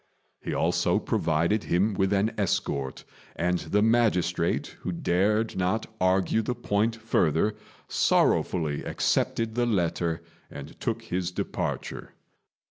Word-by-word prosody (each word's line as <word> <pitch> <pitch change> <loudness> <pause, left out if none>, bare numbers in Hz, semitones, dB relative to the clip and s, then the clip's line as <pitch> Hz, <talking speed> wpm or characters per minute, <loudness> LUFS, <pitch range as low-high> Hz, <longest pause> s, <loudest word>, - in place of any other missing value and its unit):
He - - -4
also - - +1
provided 85 +7 0
him 100 +5 +2
with 95 0 +1
an 100 +2 +2
escort; 70 -9 -1 0.3
and 90 +1 0
the 105 +1 +1
magistrate, 95 -7 +1
who - - -4
dared 100 +6 +1
not 95 +4 0 0.2
argue 95 +4 +2
the 125 +3 -2
point 110 -1 0
further, 105 -3 +1 0.3
sorrowfully 75 -5 +2
accepted 115 -1 0
the 120 +1 +1
letter 85 -5 0 0.3
and - - -10
took - - -2
his 90 0 -2
departure. 90 - -4
95 Hz, 120 wpm, -27 LUFS, 85-110 Hz, 0.3 s, him